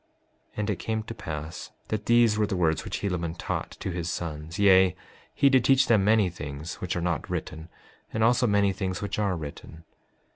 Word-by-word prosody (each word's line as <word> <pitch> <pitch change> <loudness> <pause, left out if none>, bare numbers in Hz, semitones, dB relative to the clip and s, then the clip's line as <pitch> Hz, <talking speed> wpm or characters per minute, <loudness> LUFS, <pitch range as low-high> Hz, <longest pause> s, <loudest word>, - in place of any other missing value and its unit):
5:13 - - -25
And 105 0 -1
it 100 - -3
came 110 -1 -2
to 115 - -7
pass 80 -3 -6 0.2
that 105 -1 -3
these 120 -2 +5
were 105 -1 +1
the 95 - -2
words 80 -2 +1
which - - -4
Helaman 85 -4 -2
taught - - -4
to 95 - -3
his 85 -1 -3
sons; 80 0 -5
yea, 95 -3 +5 0.4
he 140 - +4
did 130 -3 +4
teach 135 +1 +5
them 110 -6 +4
many 105 -1 +4
things 75 -1 -7
which 90 - -2
are 85 - -1
not 85 -4 -2
written, 80 +2 -5 0.4
and 110 - 0
also 120 +2 +4
many 100 -2 +3
things 95 -2 -3
which 100 - -3
are 100 -3 +1
written. 80 +1 -9
95 Hz, 205 wpm, -27 LUFS, 85-110 Hz, 0.4 s, these